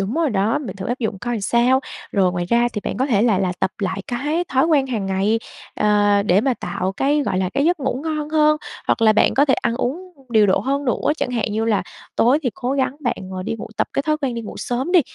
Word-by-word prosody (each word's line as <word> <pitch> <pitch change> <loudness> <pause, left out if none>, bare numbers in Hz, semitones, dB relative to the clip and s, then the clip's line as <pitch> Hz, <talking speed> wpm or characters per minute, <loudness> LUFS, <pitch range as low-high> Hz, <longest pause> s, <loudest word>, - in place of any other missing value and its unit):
Đúng 195 +5 -2
rồi 325 -3 +1
đó, 210 +1 +1
mình 230 -11 -7
thử 190 - -5
áp 245 +3 -2
dụng 220 -5 -2
coi 240 +1 -3
sao. 240 +5 +3 0.3
Rồi, 190 -3 +2
ngoài 175 -1 -2
ra 235 +6 +2
thì 210 - -3
bạn - - -3
có 260 - +1
thể 220 -6 +2
là 220 -6 +3
là 185 -2 0
tập 190 - +1
lại 195 -1 -2
cái 295 +8 -1
thói 265 +3 +2
quen 290 -5 +3
hằng 220 -6 -2
ngày, 195 +4 +1 0.4
à, 205 -1 +3
để 185 +2 +4
mà 260 +2 +1
tạo 185 -1 -3
cái, 285 +8 +1
gọi 185 - -1
là, 185 -1 -1
cái 280 - +2
giấc 340 0 +2
ngủ 265 -1 -1
ngon 305 -2 -2
hơn. 305 -1 +4 0.3
Hoặc - - +1
là 220 -1 +6
bạn - - +3
có 280 - +5
thể 270 -3 +3
ăn 235 -2 -1
uống 355 +9 -3 0.2
điều 220 -3 +4
độ 190 - +3
hơn 280 +5 -1
nữa, 270 +3 +1
chẳng 255 - -2
hạn 230 -4 -1
như 220 +1 0
là 220 -3 +1 0.3
tối 250 +5 +4
thì 250 - 0
cố 250 +2 -2
gắng 270 0 0
bạn, 240 -5 -1 0.2
ờ, 185 0 -4
đi 185 - -3
ngủ - - -7
tập - - 0
cái 275 - 0
thói 305 +1 +1
quen 270 -5 -2
đi 235 - -3
ngủ 210 - -8
sớm 255 +8 -3
đi, 360 - +7
240 Hz, 270 wpm, -21 LUFS, 205-275 Hz, 0.4 s, đi